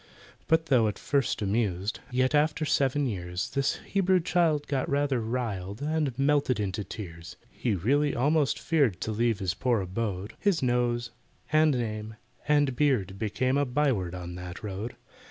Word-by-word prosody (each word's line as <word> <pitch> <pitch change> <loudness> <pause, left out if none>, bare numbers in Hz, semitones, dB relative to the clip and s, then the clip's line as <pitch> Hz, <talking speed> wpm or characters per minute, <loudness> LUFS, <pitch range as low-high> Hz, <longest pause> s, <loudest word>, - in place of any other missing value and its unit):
But 160 0 +3
though 125 -8 +4
at 105 - -3
first 135 -6 0
amused, 100 -1 -1
Yet 130 +2 +1
after 150 +1 +2
seven 140 0 +2
years, 90 -5 -3
This 140 0 +1
Hebrew 190 -2 +2
child 165 -4 +1
got 135 -3 -1
rather 140 -3 +1
riled, 110 -4 -3
And 150 -3 -1
melted 140 -4 +2
into 100 0 -2
tears. 85 -5 -8 0.2
He 115 -5 -1
really 140 - +1
almost 145 +3 +2
feared 140 - +1
To 110 - -2
leave 115 0 +1
his 95 -4 -1
poor 120 -3 +1
abode, 100 +1 -3
His 195 -8 +1
nose, 120 -1 +1 0.4
and 155 -1 +5
name, 110 -2 -4 0.3
and 145 -3 +3
beard 110 -10 +1
became 130 +5 0
A 145 - +2
byword 125 -10 0
on 90 -1 -6
that 90 +3 -8
road. 105 +3 -5
120 Hz, 155 wpm, -28 LUFS, 100-145 Hz, 0.4 s, and